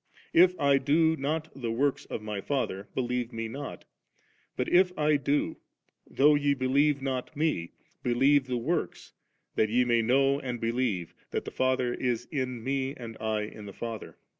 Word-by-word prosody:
If 180 +2 +5
I 140 -1 +4
do 160 +4 +3
not 155 +3 -2
the 120 -4 -4
works 135 +4 0
of 105 - -6
My 105 -2 -4
Father, 105 -7 -2
believe 125 -1 -1
Me 115 -1 -4
not 140 +5 -7 0.7
But 125 - -1
if 180 +1 +4
I 150 0 +3
do, 145 +1 0 0.5
though 150 +2 +5
je 145 -1 +2
believe 140 +2 +2
not 135 +2 -3
Me, 150 - 0 0.3
believe 135 +3 +3
the 125 -1 -1
works, 120 - -2 0.4
that 110 - +2
ye 125 +3 +3
may 120 -1 +3
know 135 +4 +3
and 125 -3 -4
believe 115 -7 -1 0.2
that - - -3
the - - -6
Father 130 -1 +1
is 120 -3 -1
in 130 -5 -3
U^ 135 0 -1
aad 115 -2 -7
I 110 -1 0
m 105 -1 -10
the 100 - -8
Father.' 115 0 -6
130 Hz, 170 wpm, -28 LUFS, 115-145 Hz, 0.7 s, If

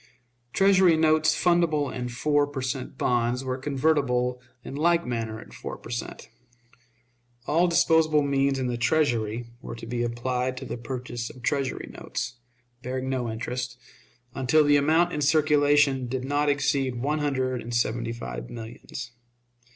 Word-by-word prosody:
Treasury 190 -2 +5
notes 155 0 +3
fundable 165 -6 +2
in 125 -1 -4
four 145 +4 +1
per 140 -2 -5
cent. 130 0 -4
bonds 120 +1 +1
were 130 -1 -2
convertible 130 -3 +1 0.2
in - - -7
like 170 +4 +2
manner 115 -3 -3
at - - -13
four - - -7
per - - -11
cent. - - -5 1.2
All 165 +6 +3
disposable 160 -3 +4
means 140 -1 +1
in 130 - -1
the 120 -1 -2
Treasury 120 -5 +1 0.2
were - - -7
to 115 - -9
be 120 +1 -3
applied 125 +2 -1
to 135 - -6
the - - -4
purchase 120 -1 -5
of 125 - -13
Treasury 135 -1 -1
notes, 125 0 -4 0.4
bearing 130 +1 -3
no 125 -3 -1
interest, 125 +2 -4 0.6
until 135 +4 +3
the 145 0 +4
amount 160 +5 +3
in 150 - -2
circulation 145 -3 +3
did 130 +1 -3
not 145 +1 +1
exceed 140 -2 +1
one 145 +6 -1
hundred 130 -4 -1
and 120 - -7
seventy 120 0 0
five - - -6
millions. 115 +1 -8
130 Hz, 150 wpm, -26 LUFS, 120-150 Hz, 1.2 s, Treasury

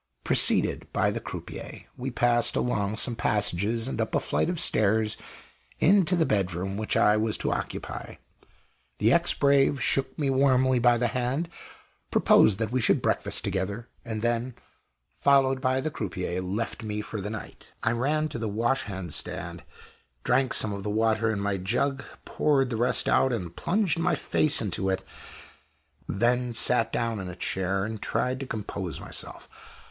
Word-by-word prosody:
Preceded - - +4
by - - +1
the - - -3
croupier, - - -8
we 130 +2 -4
passed 120 -1 +2
along 105 -4 -1
some 120 +1 +1
passages 105 +2 0
and 115 - -3
up 110 - -2
a - - +3
flight - - -1
of 175 -2 -2
stairs 110 -6 +3 0.6
into 185 0 +4
the 165 -2 +2
bedroom 95 -1 -1
which 110 +1 -1
I 105 +1 +4
was 110 0 0
to - - -2
occupy. - - -5 0.8
The - - +3
ex - - +3
brave 140 0 +3
shook 135 +2 +1
me 140 -4 0
warmly 130 -1 +3
by 120 0 +4
the 120 0 0
hand, 130 +8 -2 0.6
proposed 105 -3 +4
that 110 -1 -2
we 130 0 0
should - - +3
breakfast - - 0
together, 100 +4 -3
and 110 -2 -5
then, 120 +1 -1 0.6
followed 135 -2 +3
by 130 0 +1
the 155 +4 -3
croupier, 90 - -4
left 100 +6 -4
me 105 -1 -4
for 105 0 -6
the 105 - -4
night. 110 -1 -9
I 110 - +2
ran 145 +6 0
to 120 - -5
the 110 -1 -2
wash 120 +6 0
hand 95 -6 -6
stand; - - -5 0.6
drank 130 0 +2
some 105 - +1
of 100 - -5
the 105 - -4
water 110 +1 +1
in 105 - -2
my 100 -1 -1
jug; 125 +8 -1 0.2
poured 135 -4 +1
the - - -1
rest 120 +2 +1
out, 130 - +3
and 90 -8 -4
plunged 180 - 0
my 175 +2 +1
face 150 -5 +2
into 95 -1 -2
it; 95 - -1 1.1
then 120 +3 +1
sat 115 0 +2
down 115 -2 -2
in 95 -2 -6
a 90 - -8
chair 95 +2 -1
and 110 -1 -6
tried 130 +3 -1
to 135 - -6
compose 100 -6 -5
myself. - - -6
115 Hz, 170 wpm, -26 LUFS, 105-130 Hz, 1.1 s, Preceded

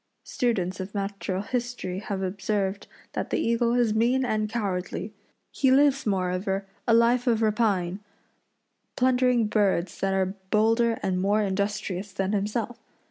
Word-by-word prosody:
Students 190 -7 -1
of 190 +2 -6
natural 195 -1 -3
history 245 -6 -3
have 200 -2 -4
observed 195 +1 -2 0.3
that - - -3
the - - 0
eagle 235 +1 +1
is 240 -3 +2
mean 245 +4 +2
and 215 -2 0
cowardly. 195 -6 -3 0.4
He 265 - +2
lives, 275 -1 +4
moreover, 190 0 -1 0.2
a 230 - +4
life 240 +2 +3
of 230 -2 +2
rapine, 205 -4 +1 1.0
plundering 250 -2 +3
birds 195 -5 0
that 195 0 0
are 190 0 0 0.2
bolder 225 +2 +3
and 185 -1 0
more 205 +2 +2
industrious 200 0 -2
than 195 0 -1
himself. 215 +3 -2
210 Hz, 135 wpm, -26 LUFS, 190-235 Hz, 1.0 s, lives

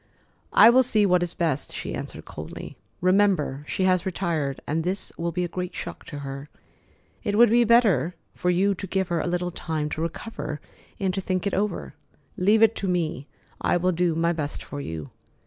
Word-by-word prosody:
"I 230 - +8
will 255 +2 +6
see 220 -4 +3
what 180 -2 +4
is 175 -1 -1
best," 155 -5 -1
she - - -5
answered - - -6
coldly. 75 +1 -8 0.3
"Remember 185 -7 +2
she 190 - -1
has 185 -1 +3
retired, 165 -7 -1
and 160 +2 -1
this 185 +3 -2
will 170 0 -2
be 180 +2 -1
a - - -1
great 180 +1 -5
shock - - -6
to 145 - -7
her. 135 +2 -6 0.7
It 205 0 0
would 235 -1 +7
be 240 +1 +6
better 200 - +4 0.2
for 180 - -1
you 190 +3 +3
to 195 +1 -6
give 190 0 -1
her 170 -1 +1
a 160 - -1
little 180 0 -1
time 155 -3 -3
to 155 - -3
recover 155 -3 -4 0.4
and 190 -2 0
to 195 - -1
think 185 0 -1
it 200 - 0
over. 185 - -1 0.4
Leave 210 +4 +4
it 225 0 +5
to 195 - -2
me. 160 -6 -1 0.3
I - - +2
will 180 +1 +2
do 170 -1 +1
my 170 +1 +2
best 150 -3 -4
for 145 - -6
you." 80 - -6
180 Hz, 200 wpm, -25 LUFS, 155-195 Hz, 0.7 s, I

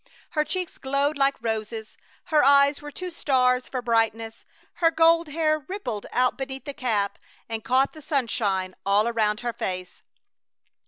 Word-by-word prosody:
Her 305 -3 +1
cheeks 365 +2 -4
glowed 280 +2 0
like 275 0 +2
roses; 220 -1 -4 0.3
her 305 -3 +3
eyes 280 +1 +5
were 295 - -7
two 365 +4 -6
stars 250 -5 +1
for 255 -2 -4
brightness. 225 -1 0 0.4
Her 330 - +6
gold 330 +1 +4
hair 310 0 +1
rippled 265 - -5
out 250 +2 +1
beneath 270 0 -5
the 285 - -5
cap 210 -6 -1 0.3
and 225 -1 -5
caught 265 +1 +2
the 310 - -12
sunshine 215 -10 -1
all 200 +3 +3
around 215 -2 0
her 240 -1 -2
face. 185 -3 -5
255 Hz, 155 wpm, -25 LUFS, 225-295 Hz, 0.4 s, Her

